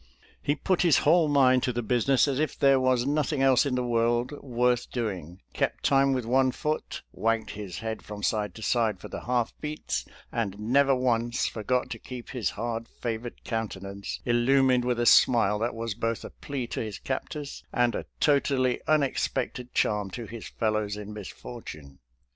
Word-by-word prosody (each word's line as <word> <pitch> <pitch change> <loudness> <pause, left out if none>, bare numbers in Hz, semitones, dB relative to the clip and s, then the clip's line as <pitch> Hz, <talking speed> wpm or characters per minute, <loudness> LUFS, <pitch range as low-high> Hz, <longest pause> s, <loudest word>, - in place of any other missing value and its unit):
He 145 - +1
put 185 +5 0
his 170 -3 +5
whole 160 +1 +5
mind 130 -3 +4
to 125 - 0
the 120 0 -3
business 125 +5 +3
as 135 -1 0
if 155 - -1
there 135 -1 +5
was 130 -1 +2
nothing 145 -1 +1
else 135 +1 +4
in 130 - 0
the 125 - 0
world 120 +1 +1
worth 125 -1 +1
doing, 95 -7 -4
kept - - -1
time 135 0 +4
with 130 -3 -1
one 130 +2 +3
foot, 155 +4 -3
wagged 115 0 0
his 100 -4 -7
head 110 -1 -3
from 105 -1 -8
side 105 -4 0
to 110 - -8
side 110 -4 +1
for - - -9
the - - -7
half 120 -2 0
beats, 150 0 -3 0.3
and 105 -5 -2
never 135 +6 +3
once 120 -1 +1
forgot 125 +3 -1
to - - -5
keep 125 -2 -8
his 125 -4 -1
hard 115 +1 -4
favored 120 0 -5
countenance 100 -3 -4
illumined 125 +1 +3
with 125 -1 0
a 120 - +1
smile 105 -4 +5
that 115 +1 -1
was 115 -1 -3
both 115 +1 -2
a - - -8
plea 140 -3 -5
to - - -5
his 110 -3 -4
captors 145 +2 -5
and 120 -1 +2
a - - -4
totally 135 -3 +2
unexpected 135 -4 0
charm 105 -2 +1
to 115 +5 -6
his 115 0 -8
fellows 110 -2 -1
in 105 0 -7
misfortune. 90 - -9
120 Hz, 180 wpm, -27 LUFS, 110-135 Hz, 0.3 s, his